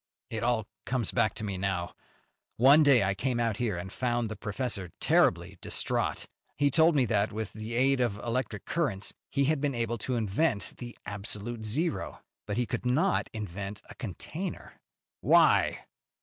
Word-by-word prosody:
"It 110 Hz, -1 st, -3 dB
all 120 Hz, -2 st, +1 dB, 0.2 s
comes 125 Hz, -3 st, 0 dB
back 115 Hz, -5 st, +2 dB
to 110 Hz, -, -6 dB
me 100 Hz, -3 st, -3 dB
now. 90 Hz, -3 st, -1 dB, 0.6 s
One 140 Hz, +6 st, +7 dB
day 140 Hz, -7 st, +6 dB
I 95 Hz, 0 st, +1 dB
came 120 Hz, +5 st, -1 dB
out 115 Hz, -3 st, 0 dB
here 110 Hz, -7 st, -1 dB
and 95 Hz, +3 st, -6 dB
found 120 Hz, -2 st, 0 dB
the 110 Hz, -, -5 dB
professor 105 Hz, -3 st, -3 dB
terribly -, -, +2 dB
distraught. -, -, -1 dB, 0.3 s
He 145 Hz, 0 st, +3 dB
told 160 Hz, +3 st, +5 dB
me 135 Hz, -3 st, +4 dB
that, 105 Hz, -1 st, +1 dB
with 110 Hz, 0 st, -4 dB
the 110 Hz, +2 st, -5 dB
aid 135 Hz, +1 st, +3 dB
of 120 Hz, -5 st, 0 dB
electric 115 Hz, -2 st, -3 dB
currents 135 Hz, -, -1 dB, 0.2 s
he 140 Hz, -, +1 dB
had 150 Hz, 0 st, +1 dB
been 145 Hz, -3 st, 0 dB
able 115 Hz, 0 st, -1 dB
to 125 Hz, +3 st, -2 dB
invent 110 Hz, +2 st, 0 dB
the 120 Hz, -1 st, -8 dB
absolute 105 Hz, +3 st, -4 dB
zero, 150 Hz, +11 st, -2 dB, 0.3 s
but 105 Hz, -, -2 dB
he 125 Hz, -, +2 dB
could -, -, -3 dB
not 150 Hz, +10 st, +2 dB
invent 100 Hz, -1 st, -6 dB
a -, -, -8 dB
container." 155 Hz, -, -6 dB, 0.5 s
"Why?" -, -, +4 dB
115 Hz, 170 wpm, -29 LUFS, 105-130 Hz, 0.6 s, One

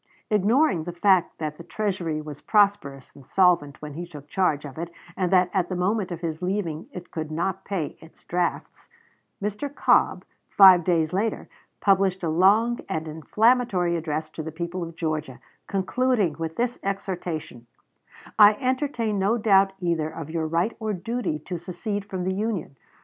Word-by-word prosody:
Ignoring 210 Hz, -, +3 dB
the 175 Hz, -, -4 dB
fact 185 Hz, 0 st, +2 dB
that 155 Hz, -1 st, -5 dB
the -, -, -8 dB
Treasury 175 Hz, -7 st, -2 dB
was 150 Hz, -1 st, -9 dB
prosperous 200 Hz, -, +1 dB
and 140 Hz, -, -15 dB
solvent 160 Hz, -3 st, +2 dB
when 150 Hz, -1 st, -6 dB
he 175 Hz, +4 st, -6 dB
took 145 Hz, -4 st, -11 dB
charge 155 Hz, -4 st, 0 dB
of 145 Hz, +1 st, -9 dB
it, 170 Hz, 0 st, -4 dB, 0.3 s
and 185 Hz, -2 st, -1 dB
that 180 Hz, -1 st, +4 dB
at 185 Hz, -3 st, 0 dB
the 185 Hz, -, -2 dB
moment 190 Hz, +2 st, 0 dB
of 170 Hz, -, -5 dB
his 160 Hz, -1 st, -4 dB
leaving 180 Hz, -4 st, -2 dB
it 180 Hz, -1 st, -9 dB
could 155 Hz, -2 st, -4 dB
not 175 Hz, +4 st, -2 dB
pay 185 Hz, -7 st, -3 dB
its 160 Hz, -, -17 dB
drafts, 175 Hz, 0 st, -3 dB, 0.5 s
Mr. 210 Hz, +8 st, -3 dB
Cobb, 285 Hz, -, +2 dB, 0.2 s
five 185 Hz, -3 st, +8 dB
days 165 Hz, -2 st, +1 dB
later, 210 Hz, +3 st, -1 dB, 0.3 s
published 190 Hz, -2 st, +2 dB
a 165 Hz, -, 0 dB
long 205 Hz, +8 st, +3 dB
and 160 Hz, 0 st, -3 dB
inflammatory 185 Hz, -, +2 dB
address 155 Hz, -1 st, -3 dB
to 160 Hz, -, -6 dB
the 160 Hz, +1 st, -6 dB
people 170 Hz, +3 st, -4 dB
of 170 Hz, -1 st, -6 dB
Georgia, 155 Hz, -5 st, -3 dB, 0.3 s
concluding 205 Hz, -1 st, +1 dB
with 160 Hz, 0 st, -4 dB
this 245 Hz, +1 st, -1 dB
exhortation: 175 Hz, -10 st, -4 dB, 0.7 s
"I 210 Hz, 0 st, +9 dB
entertain 255 Hz, -4 st, -1 dB
no 205 Hz, +5 st, +2 dB
doubt 195 Hz, -3 st, +4 dB
either 170 Hz, -4 st, 0 dB
of 160 Hz, -1 st, -8 dB
your 160 Hz, -1 st, -1 dB
right 170 Hz, +7 st, 0 dB
or 220 Hz, -1 st, -2 dB
duty 225 Hz, -2 st, -2 dB
to 180 Hz, -2 st, -4 dB
secede 195 Hz, +4 st, -4 dB
from 190 Hz, -3 st, -4 dB
the 190 Hz, +1 st, -1 dB
Union. 195 Hz, -8 st, -3 dB
180 Hz, 170 wpm, -25 LUFS, 160-205 Hz, 0.7 s, I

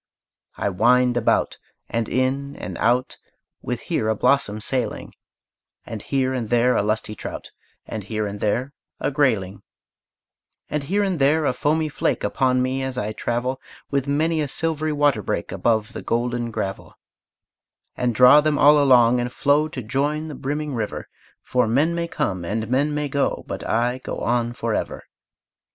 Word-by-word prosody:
I -, -, 0 dB
wind 125 Hz, +5 st, +3 dB
about, 120 Hz, -2 st, +1 dB, 0.3 s
and 115 Hz, -1 st, -2 dB
in 135 Hz, +2 st, -1 dB
and -, -, -6 dB
out, 125 Hz, +2 st, +1 dB, 0.4 s
With -, -, -4 dB
here 110 Hz, -, -1 dB
a 110 Hz, -, +2 dB
blossom 110 Hz, -3 st, +2 dB
sailing, 125 Hz, +3 st, -2 dB, 0.7 s
And -, -, -6 dB
here 130 Hz, -1 st, 0 dB
and 120 Hz, -4 st, -3 dB
there 120 Hz, +1 st, +3 dB
a -, -, +3 dB
lusty 105 Hz, +1 st, -1 dB
trout, -, -, -7 dB, 0.3 s
And 110 Hz, -2 st, -6 dB
here 110 Hz, 0 st, -2 dB
and 100 Hz, 0 st, -5 dB
there 120 Hz, +7 st, -1 dB, 0.3 s
a -, -, -1 dB
grayling, 110 Hz, -10 st, 0 dB, 1.1 s
And 150 Hz, -, 0 dB
here 195 Hz, +9 st, 0 dB
and 190 Hz, -5 st, -1 dB
there 150 Hz, +3 st, +3 dB
a 130 Hz, -, +2 dB
foamy 155 Hz, +5 st, 0 dB
flake 145 Hz, -, -1 dB
Upon 130 Hz, -1 st, +1 dB
me, 130 Hz, +1 st, -1 dB
as 130 Hz, -1 st, -3 dB
I 110 Hz, -3 st, -2 dB
travel, 125 Hz, +4 st, -2 dB, 0.3 s
With 140 Hz, -1 st, 0 dB
many 155 Hz, +3 st, +1 dB
a 150 Hz, -, -1 dB
silvery 155 Hz, +2 st, -1 dB
water 145 Hz, -6 st, +2 dB
break -, -, -3 dB
Above 115 Hz, 0 st, 0 dB
the -, -, -6 dB
golden 120 Hz, 0 st, -1 dB
gravel, 95 Hz, -3 st, -5 dB, 1.0 s
And 125 Hz, -2 st, -1 dB
draw 125 Hz, +5 st, +8 dB
them 150 Hz, -1 st, +1 dB
all 150 Hz, +1 st, +6 dB
along, 125 Hz, -3 st, +5 dB
and 120 Hz, 0 st, -2 dB
flow 145 Hz, +4 st, +2 dB
To 135 Hz, -5 st, -6 dB
join 145 Hz, +7 st, -1 dB
the -, -, -6 dB
brimming 145 Hz, +2 st, -3 dB
river, 115 Hz, -4 st, -4 dB, 0.3 s
For 125 Hz, -2 st, +1 dB
men 145 Hz, +9 st, +2 dB
may 170 Hz, 0 st, -2 dB
come 95 Hz, -, -2 dB
and 110 Hz, +5 st, -2 dB
men 145 Hz, +4 st, +1 dB
may 150 Hz, 0 st, -1 dB
go, 140 Hz, 0 st, -1 dB
But -, -, -6 dB
I 120 Hz, +3 st, +1 dB
go -, -, -6 dB
on 120 Hz, 0 st, 0 dB
forever. 115 Hz, -2 st, -3 dB
125 Hz, 170 wpm, -22 LUFS, 115-145 Hz, 1.1 s, draw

